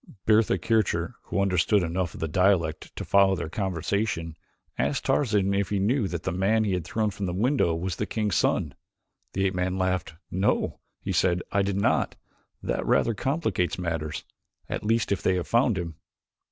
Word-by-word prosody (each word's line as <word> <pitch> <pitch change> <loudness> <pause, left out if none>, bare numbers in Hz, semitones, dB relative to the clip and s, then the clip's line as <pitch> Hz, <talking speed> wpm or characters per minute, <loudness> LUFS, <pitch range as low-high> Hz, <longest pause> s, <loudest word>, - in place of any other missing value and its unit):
Bertha 110 -2 +4
Kircher, 95 -6 0
who - - -2
understood 100 +1 +3
enough 85 0 -2
of - - -9
the 80 - 0
dialect 85 -2 +1
to - - -5
follow 100 -1 +4
their 85 -3 -4
conversation, 95 -3 -2 0.4
asked - - -1
Tarzan 105 -7 +2
if 100 -1 0
he 105 - 0
knew 105 +3 +1
that 85 -2 -4
the - - -1
man 100 +5 +2
he 100 -3 0
had 90 -2 -1
thrown 105 +4 0
from 100 0 -4
the 90 - -3
window 115 - +2
was 85 +1 -3
the - - -2
king's 105 -3 -1
son. - - +1 0.6
The 95 0 0
ape 95 - +1
man 90 +1 -1
laughed. 95 -3 -1 0.2
"No," 95 +3 0 0.2
he - - -3
said, 90 -1 +2
"I 100 - +2
did 100 0 0
not. - - +1 0.5
That - - -1
rather 115 - +2
complicates 130 - -1
matters 80 -4 -3 0.4
at - - -4
least 115 0 +1
if 100 - 0
they 95 - +2
have 90 - -2
found 115 -3 +3
him." 85 -4 -5
95 Hz, 185 wpm, -26 LUFS, 85-105 Hz, 0.6 s, Bertha